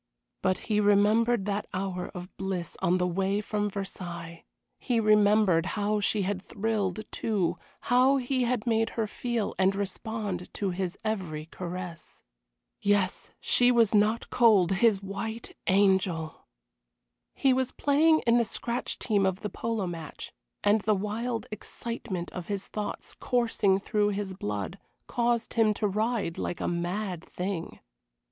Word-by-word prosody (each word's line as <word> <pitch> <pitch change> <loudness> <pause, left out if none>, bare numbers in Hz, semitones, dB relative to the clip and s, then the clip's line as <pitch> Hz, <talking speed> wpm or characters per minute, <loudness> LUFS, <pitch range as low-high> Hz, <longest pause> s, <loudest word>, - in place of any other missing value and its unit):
But 185 -1 +2
he 210 -2 +1
remembered 210 +2 +4
that 205 0 -2
hour 185 -1 -2
of 180 +1 -8
bliss 190 -4 -4
on 180 +2 +3
the 180 - +1
way 195 +3 0
from 210 0 -1
Versailles; 175 -4 -6 0.3
he 245 -3 +1
remembered 210 -5 +4
how 210 +1 +1
she 205 0 +1
had 190 0 -2
thrilled, 210 -2 -1
too, 180 -6 0 0.2
how 255 +3 +4
he 260 0 0
had 240 -2 -1
made 225 -1 +2
her 225 - +2
feel 235 0 -2
and 190 +1 +3
respond 200 -1 -3
to 195 -2 -1
his 180 +1 -3
every 175 -8 -2
caress. 175 0 -7 0.6
Yes 200 -2 +1
she 245 0 +4
was 230 -3 +4
not 215 +2 +2
cold, 215 -7 +5
his 200 0 +3
white 220 +4 -5
angel! 190 -5 +2 0.9
He 270 -1 +3
was 260 0 0
playing 315 +3 +3
in 235 0 +5
the - - +4
scratch 235 +2 -3
team 205 -4 +1
of 190 0 0
the 210 - -4
polo 225 -2 -2
match, 165 -4 -7 0.3
and 205 +1 +4
the 215 +1 +2
wild 225 +4 -2
excitement 215 -4 -5
of 180 -2 -6
his 200 -2 -3
thoughts, 210 -1 -5
coursing 225 -5 +1
through 205 0 +1
his 200 -1 -3
blood, 105 - -4 0.3
caused 235 -1 0
him 220 -2 +3
to 210 - 0
ride 215 -3 -1
like 175 - -3
a - - -1
mad 175 +1 -2
thing. 180 -2 -4
205 Hz, 145 wpm, -28 LUFS, 185-225 Hz, 0.9 s, cold